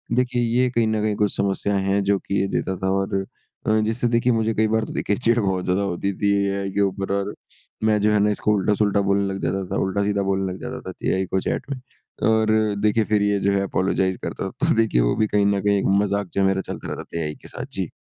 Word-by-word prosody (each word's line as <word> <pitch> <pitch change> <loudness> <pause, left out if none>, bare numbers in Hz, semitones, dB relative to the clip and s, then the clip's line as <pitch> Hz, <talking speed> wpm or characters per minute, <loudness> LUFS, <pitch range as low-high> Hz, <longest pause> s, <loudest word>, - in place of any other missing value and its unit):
देखिए 125 -1 +1
ये 120 +2 +2
कहीं 115 -2 +1
न 110 -1 0
कहीं 105 -1 0
कुछ 105 0 0
समस्याएँ 100 0 0
हैं 100 +1 +1
जो 100 0 +2
कि 100 - -2
ये 100 - 0
देता 95 -1 -2
था 95 - +2
और 95 0 -2 0.5
अ, 110 0 +3
जिससे 115 +3 0
देखिए 120 +1 +2
मुझे 115 0 +1
कई 110 0 +2
बार 110 +1 +1
तो - - -8
देखिए 105 - 0
चिढ़ 115 -1 +2
बहुत 95 -3 0
ज़्यादा 95 +2 +1
होती 100 +1 -1
थी 100 -1 +2 0.2
एआई 100 0 -2
के 100 - 0
ऊपर 100 0 -1
और 100 +1 -1 0.5
मैं 110 -1 +3
जो 105 +1 +3
है 105 - +3
ना 105 +1 +3
इसको 105 +1 +1
उल्टा-सुल्टा 100 +1 +2
बोलने 100 0 +1
लग 95 - -5
जाता 95 +1 -1
था - - 0
उल्टा-सीधा 100 +1 0
बोलने 95 -1 0
लग - - -9
जाता - - -5
था - - -11 0.2
एआई 95 0 +1
को 95 +1 -1
चैट - - -3
में। 135 - -3 0.5
और 110 0 +3 0.3
देखिए 105 +1 +3
फिर 105 -1 +1
ये 100 0 +2
जो 100 +1 +1
है 100 0 +1
अपोलोजाइज़ 95 -1 0
करता - - -3
था, - - -12 0.2
तो - - +3
देखिए 110 - +2
वो - - +2
भी 110 - +1
कहीं 105 -1 +2
न 100 -1 +2
कहीं 100 0 +2
एक - - -2 0.2
मज़ाक 100 -1 -1
जो 100 - +1
है 95 - +4
मेरा 95 0 +1
चलता - - -7
रहता - - -6
था 85 - -6
एआई 75 -1 -3
के - - -12
साथ। - - -6
जी। - - -2
100 Hz, 260 wpm, -23 LUFS, 95-110 Hz, 0.5 s, है